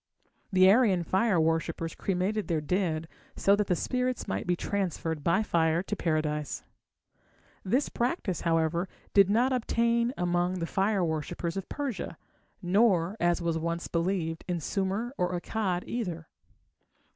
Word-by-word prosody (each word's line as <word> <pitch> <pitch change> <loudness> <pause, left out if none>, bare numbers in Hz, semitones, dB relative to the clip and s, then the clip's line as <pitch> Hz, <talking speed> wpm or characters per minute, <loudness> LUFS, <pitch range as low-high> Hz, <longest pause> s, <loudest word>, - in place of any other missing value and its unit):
The 185 -1 +6
Aryan 205 -6 +4
fire 190 +2 +2
worshippers 165 0 0
cremated 195 +3 -1
their 165 -4 +1
dead 165 0 -1 0.3
so 200 - +4
that 205 -1 0
the 180 - +2
spirits 250 +4 -1
might 95 - -3
be 180 - +2
transferred 170 -5 -2
by 170 +7 +3
fire 165 -2 +2
to 205 - -3
Paradise. 155 -4 -1 1.0
This 250 +9 +1
practice, 235 - -2
however, 165 +2 +1 0.2
did 200 -1 +6
not 245 +5 +3
obtain 235 -1 +1
among 175 0 +1
the 170 -2 -2
fire 195 +1 +1
worshippers 160 +1 -3
of 195 -1 -5
Persia, 255 - -4 0.5
nor, 185 -1 +3
as 175 0 +1
was 165 -1 0
once 170 +1 -2
believed, 170 -1 -1
in 175 -2 -1
Sumer 195 - -2
or 180 0 0
Akkad 185 -2 -2
either. 175 -9 -4
180 Hz, 140 wpm, -29 LUFS, 165-205 Hz, 1.0 s, The